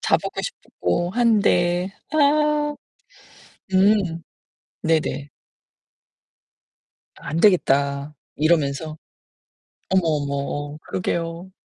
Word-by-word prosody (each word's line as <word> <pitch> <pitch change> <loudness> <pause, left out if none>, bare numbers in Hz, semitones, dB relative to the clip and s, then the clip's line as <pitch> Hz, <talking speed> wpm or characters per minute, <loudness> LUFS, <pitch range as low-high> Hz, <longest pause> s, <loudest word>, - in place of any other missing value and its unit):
자 - - +3
보고 - - -5
싶고 175 - -2
한데. 185 -6 +2 0.2
아. 300 0 +2 1.0
음. 190 -4 +3 0.6
네네. 155 -3 0 1.9
"안 160 +3 -4
되겠다." 140 -6 +2 0.2
이러면서. 155 -1 +1 0.9
어머, 190 0 +3
어머, 150 -3 0 0.4
어 - - -10
그러게요. 170 0 -3
170 Hz, 145 characters per minute, -22 LUFS, 155-200 Hz, 1.9 s, 자